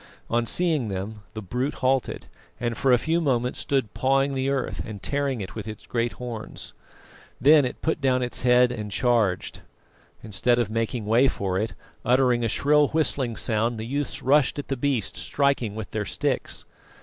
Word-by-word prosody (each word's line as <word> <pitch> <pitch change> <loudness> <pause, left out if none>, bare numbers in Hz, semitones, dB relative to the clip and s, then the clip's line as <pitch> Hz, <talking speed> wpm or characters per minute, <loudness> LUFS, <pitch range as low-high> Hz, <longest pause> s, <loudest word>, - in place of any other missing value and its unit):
On 120 0 +1
seeing 160 -7 +1
them 100 +2 -5
the 110 - -5
brute 125 +9 -2
halted, 130 0 0 0.3
and 120 -1 -1
for 135 - +2
a 125 - +7
few 165 +7 0
moments 125 -5 0
stood 135 -7 -1
pawing 135 +1 +2
the 135 0 0
earth 135 -2 -1
and 105 -2 -7
tearing 140 -4 -1
it 95 - -6
with 110 -1 -6
its 110 -1 -8
great 120 0 -1
horns. 120 -3 -7 0.7
Then 145 +2 +6
it 125 - -5
put 160 -1 0
down 130 -2 +2
its 125 - -2
head 125 0 +5
and 105 -4 -5
charged. 110 -6 +1 0.6
Instead 120 +3 +1
of 115 -3 0
making 115 0 -2
way 115 +5 +4
for 95 -6 -1
it, 110 -3 -3 0.3
uttering 125 -1 +3
a 115 - +1
shrill 150 +5 +4
whistling 140 -6 0
sound, 115 +1 0
the 110 - -4
youths 140 +4 -3
rushed 140 +1 +3
at 145 - -5
the 135 - 0
beast, 130 -5 -1
striking 140 -7 0
with 110 -2 -6
their 105 -1 -2
sticks. - - -2
125 Hz, 180 wpm, -25 LUFS, 110-135 Hz, 0.7 s, a